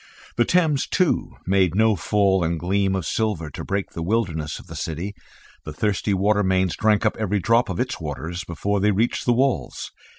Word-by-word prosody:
The 120 - +3
Thames, 160 -6 +2
too, 185 -6 0
made 95 -2 +2
no 110 0 +4
fall 95 0 +2
and 85 0 -1
gleam 95 +2 +1
of 95 -4 -2
silver 100 -9 -1
to - - -7
break 100 0 -2
the 85 - -6
wilderness 85 -6 -1
of - - -12
the - - -10
city; 85 +6 -4 0.5
the 75 - -7
thirsty 105 +3 -1
water 105 +2 +2
mains 95 -2 +1
drank 110 0 +2
up 110 - +2
every 105 -1 0
drop 115 +4 +2
of - - -3
its 130 +1 -2
waters 80 +3 -5
before 100 +5 -2
they 105 +2 +3
reached 105 +4 0
the 120 - +4
walls. 120 - -1
100 Hz, 195 wpm, -23 LUFS, 85-110 Hz, 0.5 s, no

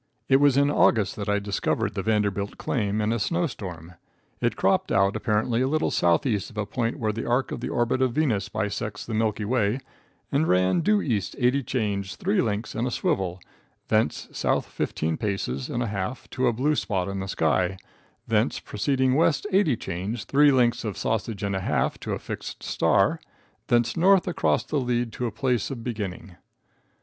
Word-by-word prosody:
It 135 - +5
was 140 -1 +4
in 140 +1 +4
August 110 -7 +3
that 105 -1 -3
I 105 - +3
discovered 100 -2 -1
the - - -2
Vanderbilt 105 -2 0
claim 105 -3 -1
in 105 +2 +1
a 115 - -1
snow 170 +10 0
storm. 90 - -7 0.5
It - - 0
cropped - - +1
out 100 +1 +3
apparently 115 +2 0
a 130 - +2
little 155 +3 +1
southeast 90 - +1
of 110 - -15
a 105 - -1
point 115 +2 -2
where 110 -2 0
the 115 - -4
arc 125 +3 +1
of - - -4
the - - -4
orbit 120 +2 0
of 130 -2 +2
Venus 120 -10 0
bisects 105 +1 -3
the 115 - -5
milky 110 -1 0
way, 115 0 +1 0.5
and 145 +3 +2
ran 90 - +3
due 210 +4 +2
east 105 -6 -1
eighty 130 +2 +2
chains, 100 -7 -2
three 195 +2 +1
links 110 0 -2
and 120 +3 -1
a - - 0
swivel, 95 -6 -1 0.5
thence 110 +1 +1
south - - 0
fifteen 80 +1 -2
paces 95 - -2
and 120 - -1
a - - -2
half 100 +5 -4
to 130 0 +1
a - - +4
blue 140 +7 +1
spot 95 -9 -1
in 100 0 -3
the 95 - -4
sky, 90 +2 +1 0.5
thence - - +1
proceeding 130 +4 0
west 155 +3 +2
eighty 185 - +3
chains, 95 +6 -4
three 145 +1 +4
links 120 -2 +2
of 105 -4 -4
sausage 110 -2 -2
and 100 -1 -1
a - - 0
half - - 0
to - - -4
a - - -1
fixed - - -7
star, - - +2 0.5
thence 120 -1 +2
north 190 +2 +4
across 180 - +1
the 150 - -1
lead 120 -2 -1
to 120 -1 -2
place 120 +1 -1
of 125 -5 -6
beginning. 100 -5 -5
110 Hz, 190 wpm, -25 LUFS, 100-130 Hz, 0.5 s, It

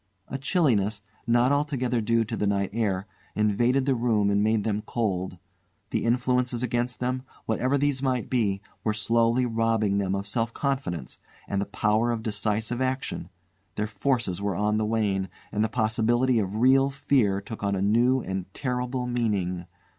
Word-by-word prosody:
A 135 - -4
chilliness, 115 - +1 0.2
not 120 +2 +4
altogether 135 -5 0
due 115 +1 +2
to 115 - -4
the 105 - 0
night 100 -1 0
air, 100 -4 0 0.3
invaded 120 +5 +2
the 135 - +3
room, 115 -4 +2
and 100 0 +2
made 110 -1 +2
them 105 -1 -1
cold. 95 -5 -2 0.5
The - - 0
influences 125 0 +1
against 120 +1 -1
them, 125 +1 -1 0.2
whatever 130 +5 +1
these 140 -1 +1
might 130 -4 0
be, 105 -6 0 0.2
were 110 -1 0
slowly 115 +3 +2
robbing 115 -3 +1
them 95 -1 0
of 100 0 -3
self 115 +3 -2
confidence, 90 - -2 0.3
and 100 0 -1
the 100 - -3
power 110 +3 +1
of 115 -2 -2
decisive 110 +3 -1
action; 130 -8 -2 0.5
their 105 - -1
forces 110 -4 -1
were 100 -2 -1
on 105 +3 +1
the 110 0 0
wane, 100 -4 0 0.2
and 105 - +1
the 110 - 0
possibility 120 +2 +2
of 100 -1 -2
real 135 +4 +4
fear 130 -8 +1
took 105 +2 -8
on 100 -1 0
a - - -1
new 120 +5 +3
and 95 -2 -4
terrible 125 -1 -2
meaning. 100 -8 -1
115 Hz, 170 wpm, -26 LUFS, 100-125 Hz, 0.5 s, not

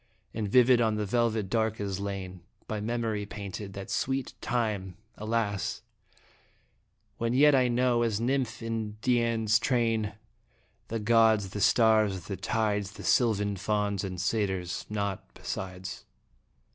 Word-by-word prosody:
And 105 -2 -2
vivid 125 0 +6
on 110 -2 +2
the 105 0 -1
velvet 110 -1 +1
dark 110 +1 0
is 100 -2 -3
lain, 95 -2 -5 0.3
By 110 -1 -3
memory 110 -2 -2
painted, 100 -1 -6
that 100 0 -7
sweet 135 0 -1
time 105 -6 -2 0.2
alas! 105 -2 -2 1.4
When 115 +1 0
yet 145 +2 +6
I 130 -2 +4
knew, 120 0 +2
as 110 -3 0
nymph 125 -2 -1
in 115 -2 -3
Dian's 115 -3 +2
train, 115 -4 0 0.7
The 115 - -3
gods, 110 -2 +3
the 105 - -4
stars, 110 -3 +4
the 100 - -4
tides, 105 0 -1
The - - -10
sylvan 105 -4 +2
fauns 105 -1 -1
and 90 -2 -4
satyrs 95 -2 -1
naught 100 -2 -2
besides. 95 0 -6
110 Hz, 135 wpm, -29 LUFS, 100-115 Hz, 1.4 s, vivid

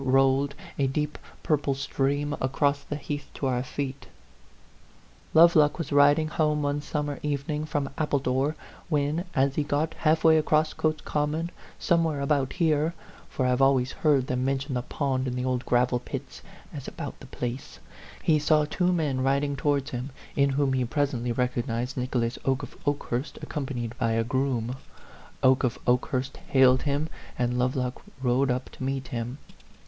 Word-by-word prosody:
rolled, 135 +1 +3 0.2
a 135 - +3
deep 150 +2 -2 0.2
purple 145 -3 +1
stream, 140 +2 -1
across 140 +2 +1
the 145 - -5
heath 145 0 -5
to - - -3
our 125 -2 +1
feet: 135 +1 -5 0.7
" - - -29
Lovelock 160 -3 +6
was 165 -5 -4
riding 145 +2 +5
home 150 -1 +1
one 145 +1 0
summer 145 -1 -3
evening 150 +1 -2
from 145 -3 -1
Appledore 135 -3 +1
r 155 - -3 0.3
when, 150 +3 0
as 135 0 +3
he 150 - 0
had 145 - -5
got 155 +3 +1
half 160 0 +1
way 160 -1 +7
across 155 0 +2
Cotes 155 -1 0
Common 150 +3 -1
r - - -21
somewhere 165 -4 +1
about 140 -1 +1
here 160 -1 +1 0.3
for 130 - -1
I - - +3
have 125 +1 +2
always 135 -1 +4
heard 145 -5 +2
them 125 -1 -1
mention 135 0 -1
the 125 - 0
pond 130 0 -1
in 125 - -2
the 125 0 -2
old 130 -1 -1
gravel 125 0 +3
pits - - -7 0.3
as - - -7
about - - -6
the - - -12
place 125 +2 -5 0.5
he 155 -2 +4
saw 150 0 +3
two 180 +4 +1
men 150 -7 0
riding 140 +2 +1
towards 140 -1 0
him, 125 +2 -4 0.3
in 140 0 +3
whom 135 0 +1
he 130 -1 +1
presently 125 -2 -1
recog 125 +1 -1
nized 120 +2 -2
Nicholas 125 -2 -1
Oke 135 +1 0
of - - -8
Okehurst 140 -1 -2
accompanied 125 -6 -4
by 115 -2 +1
a 115 0 +2
groom. 130 -1 -1 0.7
Oke 130 +1 +5
of 125 - 0
Okehurst 130 +2 0
hailed 130 -1 +4
him, 145 +1 0 0.3
and 125 0 0
Lovelock 125 0 -1 0.2
rode 130 +2 +2
up 125 +1 -2
to - - -8
meet 135 -1 -2
him. 120 +1 -4
140 Hz, 175 wpm, -27 LUFS, 130-150 Hz, 0.7 s, way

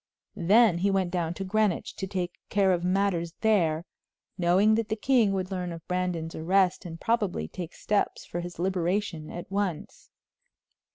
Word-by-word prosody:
Then 200 0 +4
he 200 +3 +2
went 190 -2 +1
down 175 -2 -1
to 195 - -4
Greenwich 205 -1 0
to 190 - -3
take 180 -2 -3 0.2
care 195 -2 +3
of 175 -1 -1
matters 180 -3 0
there, 175 -7 +2 0.5
knowing 185 +4 +4
that 220 0 0
the 220 - 0
king 230 -2 +3
would 185 0 -2
learn 180 -2 -3
of 165 -1 -9
Brandon's 180 -3 -2
arrest 185 +3 +1
and 165 -1 -7
probably 205 - 0
take 175 - -7
steps 205 -1 -1
for 175 - -5
his 175 0 -7
liberation 180 -2 -1
at 175 +2 -8
once. 195 -5 -3
185 Hz, 165 wpm, -27 LUFS, 175-200 Hz, 0.5 s, Then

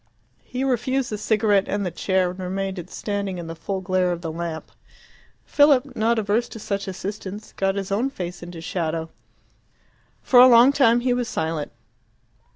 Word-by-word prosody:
He 255 +1 -4
refused 260 0 0
the 210 - -2
cigarette 210 -2 +2
and 205 -1 -2
the 180 - -2
chair, 185 +1 0
and 185 - -11
remained 190 0 -3
standing 200 -2 -3
in 170 - -6
the 165 0 -7
full 190 +4 -4
glare 185 -1 +1
of 170 -1 -4
the 165 -2 -4
lamp. 165 -1 -5 0.7
Philip, 280 -3 +3
not 230 +1 +1
averse 220 +3 0
to - - -9
such 200 -1 -3
assistance, 200 +2 -6
got 195 0 0
his 195 -1 -4
own 230 +7 +1
face 180 -8 -6
into 175 -1 -8
shadow. 165 -1 -3 1.1
For 250 - +5
a 250 - +10
long 240 +2 +7
time 240 -4 +4
he 250 0 +1
was 245 -1 -2
silent. 160 -2 -3
200 Hz, 170 wpm, -23 LUFS, 180-235 Hz, 1.1 s, a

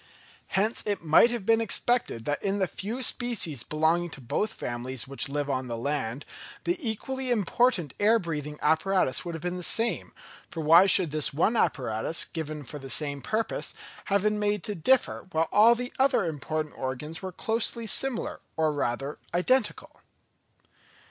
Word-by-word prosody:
Hence 215 +4 +1
it 205 -4 -1
might 160 +9 +6
have 235 -5 -4
been 225 +1 +4
expected 230 - 0
that 145 0 -1
in 200 0 0
the 190 - +2
few 220 +8 -4
species 225 - 0
belonging 160 +5 +1
to 145 - -8
both 205 - -2
families 120 - -4
which 140 0 -1
live 145 0 -2
on 130 -2 -2
the 115 -1 -4
land, 135 0 -3 0.4
the 350 - +1
equally 260 +2 -3
important 215 - +1
air 215 +3 +5
breathing 150 -6 -4
apparatus 160 -1 +2
would 170 -2 -5
have 160 - -8
been 180 0 -2
the - - -6
same; 230 +6 -1 0.4
for 165 - -5
why 165 +5 +7
should 185 -5 +5
this 155 -1 +2
one 200 +9 +2
apparatus, 125 - 0
given 155 -2 -6
for 145 +3 -8
the 135 -1 -9
same 140 +4 0
purpose, 220 +7 -2 0.3
have 200 -1 +1
been 210 0 +1
made 205 -3 0
to 210 - 0
differ, 205 +5 +1
whilst 160 -1 0
all 225 +3 +7
the 245 +1 -5
other 265 -7 +3
important 155 0 -3
organs 135 +5 -4
were 190 -1 -5
closely 225 +4 -1
similar, 245 +3 0 0.2
or 155 -1 +2
rather, 135 +1 -2 0.2
identical. 220 +6 0
175 Hz, 170 wpm, -27 LUFS, 145-220 Hz, 0.4 s, why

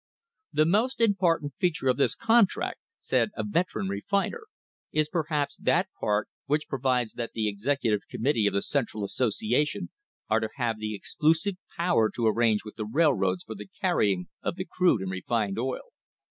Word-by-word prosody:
/ 460 +1 -65
' - - -52
"The 155 - +3
most 220 +10 +2
important 175 - +2
feature 165 -7 0
of 130 - +3
this 140 - +2
contract," 230 -3 +2 0.2
said - - +1
a - - -1
"vet 185 -3 +1
eran 100 -3 -2
refiner," 200 - -1 0.4
"is 155 -1 +1
perhaps 150 -3 -1
that 185 +3 +2
part 105 -1 +1 0.2
which 150 +2 0
provides 130 -4 0
that 120 -1 -5
the 110 -1 0
Executive 105 0 0
Committee 115 -4 +1
of - - 0
the 100 - +1
Central 120 -7 -1
Association 120 +6 0 0.4
are 110 - +3
to 110 0 -2
have 120 -5 -1
the 110 0 -3
exclusive 160 - +1 0.2
power 170 -11 +3
to 120 - 0
arrange 110 -1 +2
with 105 - -10
the 110 -2 -3
railroads 110 - +2
for 110 - -7
the 105 -1 -10
carrying 95 -4 +1
of - - -2
the 185 0 -4
crude 180 - +2
and 95 - -3
refined 100 +2 -1
oil. 130 +1 -3
130 Hz, 175 wpm, -27 LUFS, 110-170 Hz, 0.4 s, The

